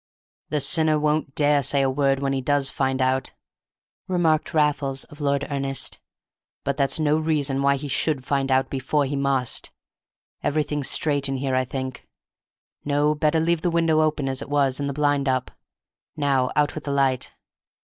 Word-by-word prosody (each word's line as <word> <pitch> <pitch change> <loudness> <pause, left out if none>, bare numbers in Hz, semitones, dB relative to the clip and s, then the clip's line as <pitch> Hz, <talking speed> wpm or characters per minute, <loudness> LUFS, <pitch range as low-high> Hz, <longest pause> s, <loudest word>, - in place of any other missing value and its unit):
"The 150 - 0
sinner 155 +2 +2
won't 150 -2 0
dare 145 -1 +3
to - - -2
say 140 +2 +1
a - - +2
word 135 0 +1
when 135 0 0
he 135 - -1
does 140 0 +1
find 130 -1 0
out," 130 +1 0 0.7
remarked 165 -4 +1
Raffles 140 -3 +1
of 150 +1 -14
Lord 140 0 +1
Ernest; 135 -1 -3 0.6
"but 140 - -1
that's 140 +1 +1
no 155 0 +2
reason 145 -4 0
why 140 0 +3
he 140 +1 -5
should 135 0 0
find 140 -1 0
out 130 0 +3
before 140 +2 0
he 140 +1 -3
must. 135 -3 0 0.7
Everything's 150 -1 -1
straight 145 -3 +1
in 135 - -1
here, 135 0 -2
I 130 0 +2
think; 130 0 -6 0.8
no, 145 +1 +2
better 155 +1 +1
leave 165 0 +1
the 175 - +1
window 165 -2 +2
open 155 -3 0
as 130 0 -2
it - - -7
was, 140 -2 +1
and 140 0 -1
the - - -3
blind 145 -1 +1
up. 130 -1 -1 0.7
Now 135 -3 +1
out 150 0 +2
with 155 - -7
the 140 - -2
light. 135 -2 0
140 Hz, 180 wpm, -24 LUFS, 135-150 Hz, 0.8 s, dare